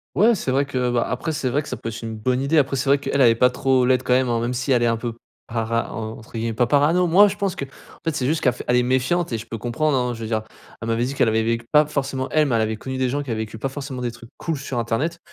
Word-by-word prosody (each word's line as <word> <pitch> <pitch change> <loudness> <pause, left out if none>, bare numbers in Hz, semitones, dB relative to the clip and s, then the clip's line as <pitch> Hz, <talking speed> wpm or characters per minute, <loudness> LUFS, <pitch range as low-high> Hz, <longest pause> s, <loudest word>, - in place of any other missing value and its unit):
Ouais, 225 +5 +5
c'est 170 - -2
vrai 140 +2 +2
que, 125 -3 -1
bah, 120 -1 +1
après, 125 +7 -2
c'est 135 -4 -1
vrai 145 +5 0
que - - -11
ça - - -4
peut - - -5
être 115 +1 -6
une 110 -1 -5
bonne 125 +4 0
idée. 155 +3 +2
Après, 135 -1 +2
c'est 135 +1 0
vrai 140 - +5
qu'elle 140 0 -1
est 115 -2 +6
pas 125 +2 +4
trop 130 -1 +2
laide 130 -1 +3
quand 130 -1 -1
même, 130 0 +3
hein, 115 -1 +1
même 120 - -1
si 130 +3 -2
elle 125 -2 +4
est 120 - +3
un 115 -1 +1
peu 120 -1 -4 0.3
para 115 0 -2
en 110 +1 -5
entre 110 - -15
guillemets, 115 0 -2
pas 120 +2 +1
parano. 155 +6 +3
Moi, 200 +5 +6
je 200 - -4
pense 195 -3 -2
qu'en 140 - -3 0.4
fait, 165 - -1
c'est 130 -4 -1
juste 155 +3 0
qu'elle 125 - +4
fait 125 - -8
elle 125 - +4
est 125 - +4
méfiante 130 +6 +1
et 115 - 0
je 110 - -8
peux 115 - -5
comprendre, 130 +6 0
hein, 125 -1 0
je 115 - -8
veux 110 - -4
dire 110 -1 -1 0.4
elle 115 - -4
m'avait 115 +2 +1
dit 135 - -4
qu'elle 135 -5 +2
avait 110 0 +2
vécu 115 +1 -1
pas 150 0 +6
forcément 135 -2 -2
elle, 155 -1 +3
mais 125 - 0
elle - - +2
avait 110 0 0
connu 130 +4 -5
des 130 - +1
gens 145 +3 -1
qui 135 - -7
avaient 110 - -1
vécu 110 0 -5
pas 135 +5 -2
forcément 135 -2 -6
des 120 -1 -2
trucs 115 -1 -13
cools 165 -3 -3
sur 135 -3 -4
Internet. 125 +9 -1
125 Hz, 325 wpm, -22 LUFS, 115-140 Hz, 0.4 s, est